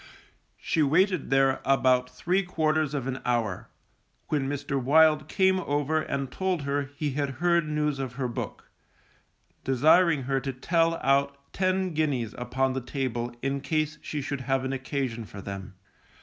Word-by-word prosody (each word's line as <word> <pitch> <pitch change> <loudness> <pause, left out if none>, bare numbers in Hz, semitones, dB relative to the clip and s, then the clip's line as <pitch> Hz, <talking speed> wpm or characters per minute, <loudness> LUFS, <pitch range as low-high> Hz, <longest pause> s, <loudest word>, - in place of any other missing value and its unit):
She 160 - 0
waited 180 +4 +2
there 135 0 +3
about 130 -2 +3
three 175 +9 0
quarters 155 -4 0
of 135 -3 -2
an 135 0 -4
hour, 115 -6 -1 0.6
when 140 -3 0
Mr. 140 -1 -2
Wild 150 +2 +5
came 190 +1 +2
over 145 -1 0
and 140 -3 -3
told 185 -3 -1
her 140 0 -1
he 150 0 -2
had 140 0 -2
heard 170 0 +2
news 150 -2 0
of 130 -3 -4
her 130 0 -2
book, 120 - -6 0.9
desiring 150 +3 +4
her 135 +1 0
to 135 +1 -4
tell 165 +5 +1
out 140 +1 +2 0.2
ten 185 -1 0
guineas 140 -8 -1
upon 130 +2 -1
the 130 - -2
table 120 -2 -3
in 140 0 -1
case 155 0 -1
she 150 -2 -4
should 140 0 -3
have 135 +1 0
an 130 - -2
occasion 130 -3 -3
for 100 -1 -10
them. 95 0 -7
140 Hz, 160 wpm, -27 LUFS, 130-155 Hz, 0.9 s, Wild